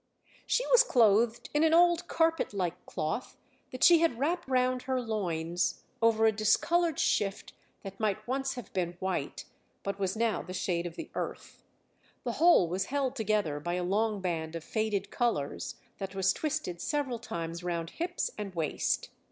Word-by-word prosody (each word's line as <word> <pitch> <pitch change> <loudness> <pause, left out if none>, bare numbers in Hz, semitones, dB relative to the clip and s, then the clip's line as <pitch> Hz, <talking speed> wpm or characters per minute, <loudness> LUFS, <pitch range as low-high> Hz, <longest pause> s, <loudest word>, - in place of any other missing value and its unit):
She - - +1
was - - +8
clothed 235 - +3
in 295 +1 +3
an 320 0 +5
old 345 0 +4
carpet 325 -9 +1
like 180 -4 -3
cloth 155 +11 -3 0.3
that 255 - -3
she 345 -2 +8
had 330 -8 +2
wrapped 335 +6 -1
round 255 -1 +1
her 260 0 -1
loins 175 -7 -2 0.2
over 225 -1 +4
a 220 - +6
discoloured 320 +10 +2
shift 200 -1 0 0.3
that 195 -1 -8
might 215 0 -1
once 270 +1 -1
have 245 -5 -9
been 175 -2 -1
white, 190 0 -3 0.4
but 200 0 -3
was 190 0 -1
now 230 -1 +1
the 185 - -8
shade 175 -2 -1
of 165 - -9
the - - -8
earth; - - -6 0.6
the - - -1
whole 335 - +6
was 185 +3 -1
held 270 0 -1
together 210 - 0
by 175 +4 -2
a 180 - -1
long 210 +2 0
band 165 -3 -2
of 165 - -5
faded 210 -2 -2
colours 225 - -1 0.2
that 195 -1 -5
was 190 0 +3
twisted 300 - -3
several 280 -5 -1
times 170 -6 -5
round 170 -2 -3
hips 350 +2 -2
and 200 -3 -5
waist. 160 -3 -1
215 Hz, 170 wpm, -30 LUFS, 180-265 Hz, 0.6 s, was